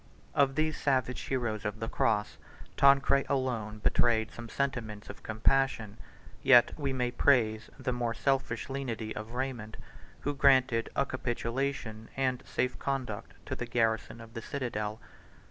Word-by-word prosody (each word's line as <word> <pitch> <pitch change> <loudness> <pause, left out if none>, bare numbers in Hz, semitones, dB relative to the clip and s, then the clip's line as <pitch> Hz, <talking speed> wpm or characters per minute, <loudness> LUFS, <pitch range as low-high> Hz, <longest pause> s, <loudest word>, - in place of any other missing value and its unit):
Of 135 -1 +3
these 155 0 0
savage 130 -3 +1
heroes 120 -5 -1
of 105 0 -3
the 115 - -3
cross, 105 -2 0 0.4
Tancred 140 0 +5
alone 120 -6 -1
betrayed 110 +1 +2
some 120 -1 -9
sentiments 115 -7 -3
of - - -15
compassion; 110 -1 +1 0.4
yet 120 -2 +7
we 140 -3 -2
may 125 -2 0
praise 115 -4 +2
the 125 - -2
more 120 -1 -1
selfish 135 -4 0
lenity 120 -5 -4
of 110 +2 -6
Raymond, 125 -4 -3 0.4
who 145 - -1
granted 130 -4 +4
a - - +2
capitulation 120 -2 -3
and 130 -2 +1
safe 125 0 -1
conduct 130 -6 -3
to - - -3
the - - -5
garrison 115 -1 0
of 115 0 -12
the 115 - -5
citadel. 110 -6 -3
120 Hz, 145 wpm, -30 LUFS, 110-135 Hz, 0.4 s, yet